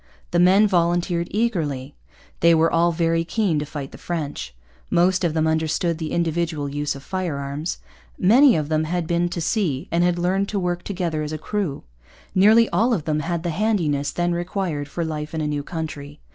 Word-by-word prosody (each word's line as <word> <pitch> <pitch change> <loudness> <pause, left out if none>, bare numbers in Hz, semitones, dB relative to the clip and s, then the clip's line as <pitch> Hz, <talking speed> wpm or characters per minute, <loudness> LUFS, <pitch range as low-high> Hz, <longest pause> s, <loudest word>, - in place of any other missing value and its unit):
The 175 - +2
men 190 +4 +6
volunteered 175 -2 +1
eagerly. 155 - -1 0.4
They 170 0 +5
were 165 +1 +3
all 170 +1 +3
very 165 0 +1
keen 175 -3 0
to 145 - -4
fight 140 -2 -6
the - - -12
French. 145 - -4 0.3
Most 185 +2 +2
of 165 -2 0
them 160 0 +2
understood 160 +1 0
the 160 -2 -4
individual 165 -3 -1
use 145 +1 -2
of 140 - -10
firearms. 150 -4 -3 0.4
Many 245 +7 +6
of 155 -2 -1
them 155 0 0
had 175 +1 -2
been 170 +1 0
to 170 - -4
sea 165 - -1
and 170 +1 +2
had 175 0 +2
learned 190 +3 0
to 205 - -1
work 175 -1 -1
together 175 -5 -3
as 150 0 -4
a - - -2
crew. 180 -2 -3 0.5
Nearly 220 +4 +6
all 235 +2 +2
of 160 -6 -5
them 155 -1 0
had 170 +2 -2
the 175 - -1
handiness 160 -7 0
then 175 0 0
required 175 -4 -2
for 170 +3 -3
life 155 0 -4
in 160 - -1
a - - -1
new 150 -1 -1
country. 150 -2 -6
170 Hz, 195 wpm, -22 LUFS, 150-180 Hz, 0.5 s, men